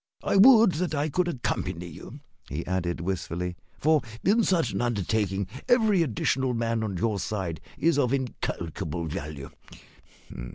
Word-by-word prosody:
"I - - 0
would 225 0 +8
that 175 -2 -1
I 145 +2 0
could 180 +4 +1
accompany 120 - -2
you," 85 -3 -10 0.3
he 75 +3 -4
added 85 -2 -2
wistfully, 90 -1 -3 0.2
"for 155 0 +3 0.2
in 220 +5 +4
such 180 -5 +2
an - - -2
undertaking 100 -3 0 0.2
every 220 -7 +4
additional 130 -2 0
man 115 -1 0
on 100 -4 -3
your 105 +1 0
side 95 -5 -3 0.2
is 160 +1 +2
of 125 -4 +2
incalculable 85 - -3
value. 75 -2 -6
115 Hz, 140 wpm, -27 LUFS, -, 0.3 s, would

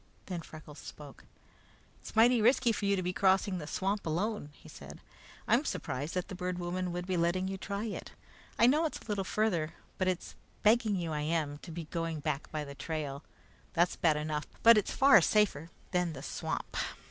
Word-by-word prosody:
Then 180 -3 -4
Freckles 155 -2 -11
spoke. 145 -2 -11 0.7
"It's - - -11
mighty 235 +1 +6
risky 240 +1 +4
for 210 - -2
you 200 0 +3
to 185 - -2
be 180 +1 -1
crossing 190 -1 +2
the 150 - -7
swamp 195 +5 -1
alone," 180 +1 -1
he - - -17
said. - - -11 0.5
"I'm - - +4
surprised 145 +7 -3
that 180 - -1
the - - -7
Bird 180 0 -3
Woman 180 +1 -2
would 175 +1 -4
be 185 -1 -1
letting 175 +2 +1
you 195 0 -4
try 200 +2 -3
it. 215 - -6 0.5
I 230 - +6
know 300 +7 +4
it's 310 - -2
a - - -15
little 205 -3 -1
farther, 180 -6 0 0.2
but 185 - +1
it's 185 -1 -2 0.3
begging 215 -1 +4
you 170 -3 -2
I 150 -1 -1
am 150 -2 -1
to 175 - -11
be 165 +1 -5
going 165 0 -3
back 150 -1 -3
by 155 -1 -2
the 140 - -8
trail. 150 -1 -4 0.5
That's 175 0 +2
bad 155 -3 +2
enough, 150 -1 -3 0.2
but 230 0 +9
it's 210 - +1
far 270 -7 +6
safer 170 -5 +2 0.2
than 180 -2 +1
the 135 - -8
swamp." - - -4
180 Hz, 200 wpm, -31 LUFS, 155-200 Hz, 0.7 s, but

